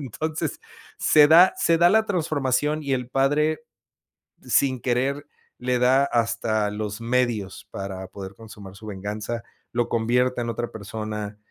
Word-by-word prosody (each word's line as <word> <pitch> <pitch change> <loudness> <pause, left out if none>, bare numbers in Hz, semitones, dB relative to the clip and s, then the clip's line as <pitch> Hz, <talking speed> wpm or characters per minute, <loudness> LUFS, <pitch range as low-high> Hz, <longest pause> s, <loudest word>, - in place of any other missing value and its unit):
Entonces, 155 +4 -4 0.4
se 150 -1 +6
da 175 +4 +7
se 165 - +3
da 175 +1 +6
la 220 +2 +3
transformación 150 -4 0
y 140 -1 -2
el 125 -1 -3
padre, 150 +4 +1 0.8
sin 130 -3 +2
querer, 135 +3 -1 0.3
le 125 0 -1
da 130 +2 +4
hasta 110 -4 0
los 105 +1 -5
medios 115 -4 -1
para 95 -1 -6
poder 95 0 -9
consumar 105 -4 -12
su 110 +2 -13
venganza, 105 +4 -5 0.3
lo 120 -1 0
convierte 125 +2 +1
en 120 - -3
otra 120 +1 -3
persona, 105 0 -6
120 Hz, 140 wpm, -24 LUFS, 105-140 Hz, 0.8 s, da